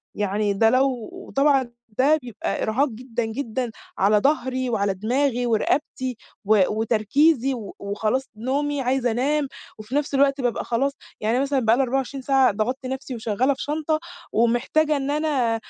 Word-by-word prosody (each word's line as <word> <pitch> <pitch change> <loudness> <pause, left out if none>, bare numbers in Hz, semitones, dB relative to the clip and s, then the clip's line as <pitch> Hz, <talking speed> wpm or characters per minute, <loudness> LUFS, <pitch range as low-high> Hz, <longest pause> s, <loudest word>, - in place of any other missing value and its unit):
يعني 205 0 0
ده 225 +3 +4
لو 255 -1 +1 0.3
طبعًا 275 -3 +3 0.3
ده 290 +4 +4
بيبقى 240 -3 -4
إرهاق 250 +7 +2
جدًا، 240 0 -4
جدًا 235 +1 -3 0.3
على 205 +2 +4
ضهري 260 -1 0
وعلى 200 -4 +1
دماغي 245 +5 0
ورقبتي، 250 +2 0 0.3
و 210 0 +5
وتركيزي 235 +6 +2
و 220 -6 -7
وخلاص 215 +6 -1
نومي 280 +5 -1
عايزة 255 -1 +1
أنام، 280 +5 +1 0.3
وفي 215 +5 -7
نفس 290 0 0
الوقت 275 0 +3
بابقى 245 -2 -1
خلاص 265 +4 0 0.3
يعني 220 +2 +1
أنا 255 - +2
مثلًا 280 -1 +1
بقى 225 -2 +3
لي 270 - +3
24 270 +1 -2
ساعة 265 -1 +4
ضَغَطت 250 +6 -2
نفسي 265 0 -4
وشغّالة 230 +4 +1
في 270 - -6
شنطة، 310 +1 -1 0.3
ومحتاجة 240 +7 +2
إن 275 0 -2
أنا 290 -6 +1
255 Hz, 155 wpm, -23 LUFS, 225-275 Hz, 0.3 s, و